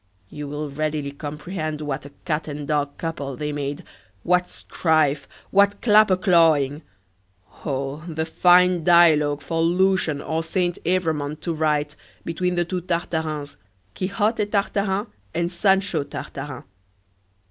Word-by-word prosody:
you 150 -1 -7
will 150 +1 -4
readily 150 -1 -2
comprehend 150 +2 -5
what 145 -2 -4
a - - -15
cat 155 -1 -1
and 145 -1 -6
dog 145 -1 -1
couple 145 -5 -4
they 150 +3 -3
made! 145 0 -4 0.4
what 180 0 +2
strife! 155 -4 0 0.2
what 200 +1 +4
clapper 210 -4 +5
clawing! 160 -6 +3 0.8
Oh, 135 -1 -2
the 160 -1 -2
fine 180 +1 +4
dialogue 155 -4 +5
for 165 -1 -1
Lucian 180 -2 +2
or 160 +2 -2
Saint 175 +1 -1
Evremond 160 -4 -1
to 170 - -2
write, 150 -1 0 0.3
between 180 +2 -1
the 175 0 +1
two 180 +1 -3
Tartarins 160 -4 -3 0.4
Quixote 205 - 0
Tartarin 200 0 0 0.3
and 170 0 0
Sancho 195 -2 +2
Tartarin! 140 -1 -7
160 Hz, 125 wpm, -23 LUFS, 150-180 Hz, 0.8 s, clapper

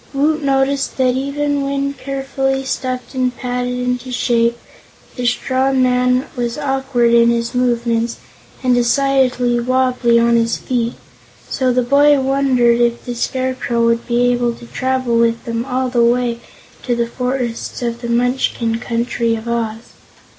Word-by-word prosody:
Woot 305 +3 +1
noticed 275 0 0
that 255 -1 +2
even 285 +2 -1
when 275 0 -1
carefully 270 -1 -2
stuffed 255 0 -4
and 255 -1 -1
patted 250 0 -2
into 250 0 -2
shape, 235 -1 +1 0.6
the 250 -2 -2
straw 260 +2 +1
man 250 0 +2
was 240 0 -2
awkward 265 -4 +1
in 235 0 +5
his 235 +1 -1
movements 235 -2 0 0.5
and 255 -1 +3
decidedly 250 -1 +2
wobbly 250 -1 +2
on 235 0 +3
his 230 0 +1
feet, 240 -2 -2 0.6
so 260 -2 +1
the 250 0 +1
boy 285 +3 +4
wondered 260 -3 +2
if 235 0 0
the 245 - -4
Scarecrow 255 -1 -1
would 230 0 +1
be 245 0 +2
able 240 -1 0
to 235 - -13
travel 255 -1 -1
with 230 0 +1
them 230 0 -2
all 260 0 -1
the 245 -1 +2
way 240 0 +1 0.4
to 245 - -1
the 235 0 0
forests 250 0 -3
of 235 0 -3
the 235 - -5
Munchkin 235 -1 0
Country 235 -1 -1
of 225 +1 -7
Oz. 230 -1 -3
250 Hz, 150 wpm, -17 LUFS, 235-265 Hz, 0.6 s, in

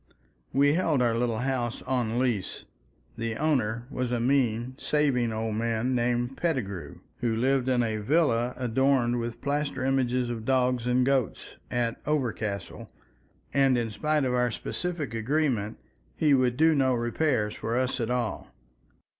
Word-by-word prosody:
We 145 +2 +4
held 160 -4 +2
our 120 -2 +2
little 115 -1 0
house 125 -3 -2
on 120 -3 -1
lease; 120 -7 -1 0.5
the 115 -1 -2
owner 120 -5 0
was 125 -1 -2
a 120 - 0
mean, 120 -1 +1
saving 135 -6 +1
old 110 0 -2
man 115 +2 0
named 120 +1 0
Pettigrew, 100 - -3 0.2
who 115 -2 0
lived 130 +2 +1
in 125 -2 +3
a 110 -2 -1
villa 125 0 +1
adorned 125 0 +2
with 115 0 -5
plaster 140 -2 -1
images 125 -2 +1
of 115 -2 -5
dogs 125 -1 +1
and 125 +1 +3
goats, 135 -6 -1
at 120 -1 -2
Overcastle, 110 -9 -2 0.6
and 135 -2 +4
in 115 -2 -1
spite 150 +7 0
of 125 - 0
our 125 0 +2
specific 150 - -4
agreement, 115 -3 0 0.4
he 150 -3 +3
would 125 -2 +2
do 160 +2 +5
no 130 -3 +2
repairs 120 -2 0
for 115 +2 -2
us 130 +1 0
at 115 -1 -1
all. 125 -2 -2
125 Hz, 150 wpm, -27 LUFS, 115-135 Hz, 0.6 s, do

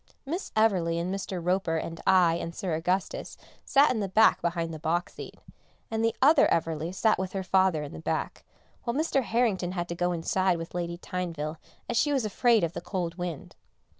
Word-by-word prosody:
Miss 335 +7 -4
Everleigh 185 -7 +2
and 180 +3 -2
Mr. 195 -1 -4
Roper 180 -3 +1
and 165 +1 -5
I 180 -3 +5
and 165 0 -5
Sir 185 -5 -3
Augustus 180 +4 -2 0.3
sat 285 +1 +4
in 240 - -1
the 195 -3 -3
seat 220 - +6
behind 170 -1 -2
the 155 - -7
box 170 +3 -1
seat, - - -9 0.5
and 225 0 -1
the 225 0 +1
other 295 +1 +6
Everleigh 165 0 -1
sat 215 +3 +2
with 190 -1 -3
her 195 -1 -2
father 185 -4 +2
in 145 - -8
the 80 - -8
back, - - -3 0.4
while 235 - -2
Mr. 300 -2 +1
Harrington 220 -7 0
had 175 -2 -3
to 170 - -3
go 175 +1 0
inside 180 +2 +1
with 165 0 -7
Lady 170 -1 -3
Tyneville 170 -4 -4 0.3
as 240 - -1
she 295 - +3
was 270 -5 +1
afraid 225 +1 +3
of 170 0 -1
the - - -5
cold 175 -2 -4
wind. 175 -5 -5
180 Hz, 200 wpm, -28 LUFS, 170-215 Hz, 0.5 s, seat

